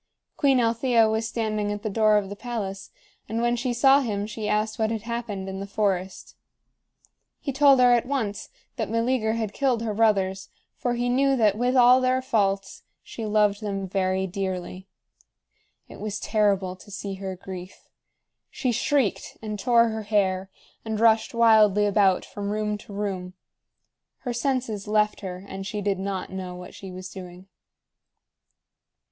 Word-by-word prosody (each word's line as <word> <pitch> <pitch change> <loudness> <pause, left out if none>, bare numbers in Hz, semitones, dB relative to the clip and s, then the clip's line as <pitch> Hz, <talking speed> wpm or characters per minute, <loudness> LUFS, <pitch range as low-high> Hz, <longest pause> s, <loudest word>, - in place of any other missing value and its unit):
Queen 275 -3 +3
Althea 230 0 +3
was 220 +1 0
standing 215 -2 -2
at 205 0 -5
the - - -2
door 215 0 +4
of 200 -2 -1
the 205 - -6
palace, 200 -4 -5 0.4
and 225 - -2
when 240 +1 +2
she 245 +1 -2
saw 270 +3 +5
him 205 -5 -2
she 215 0 -4
asked 215 +1 0
what 220 0 +2
had 220 -2 -3
happened 230 -5 -4
in 190 0 -5
the 200 - -5
forest 195 -2 -2 1.0
He 275 - -4
told 275 -1 +6
her 250 -1 +6
at 240 0 +2
once 225 -8 -2 0.3
that - - -2
Meleager 230 0 +1
had 220 -3 -3
killed 255 -5 0
her 220 -2 -2
brothers, 195 -3 +1 0.3
for 245 -1 -1
he 245 +1 -1
knew 270 +2 +3
that, 215 -5 +3
with 245 +3 0
all 250 +1 +7
their 255 0 +2
faults, 200 -6 -1 0.2
she 225 -2 -6
loved 210 0 +2
them 195 -2 -3
very 190 0 0
dearly. 185 -1 -4 1.0
It - - -12
was 210 -1 -4
terrible 200 -4 +1
to 205 - -16
see 200 0 -5
her 190 -1 -4
grief. 185 0 -10 0.6
She 255 - -1
shrieked, 255 -2 0
and 215 -2 -5
tore 235 +2 +4
her 220 0 -4
hair, 195 -3 0 0.3
and 220 -1 -3
rushed 225 0 +3
wildly 215 -3 +5
about 200 -2 +3
from 200 -1 -5
room 210 0 -1
to 210 - -13
room. 190 -3 -4 0.9
Her 245 - -3
senses 240 -5 -2
left 210 0 +1
her, 185 -1 -6
and 195 0 -6
she 210 +1 -4
did 200 -2 -1
not 195 -1 -4
know 185 -1 -5
what 180 0 -10
she 190 -1 -9
was 185 +1 -7
doing. 180 -1 -10
210 Hz, 165 wpm, -25 LUFS, 195-235 Hz, 1.0 s, all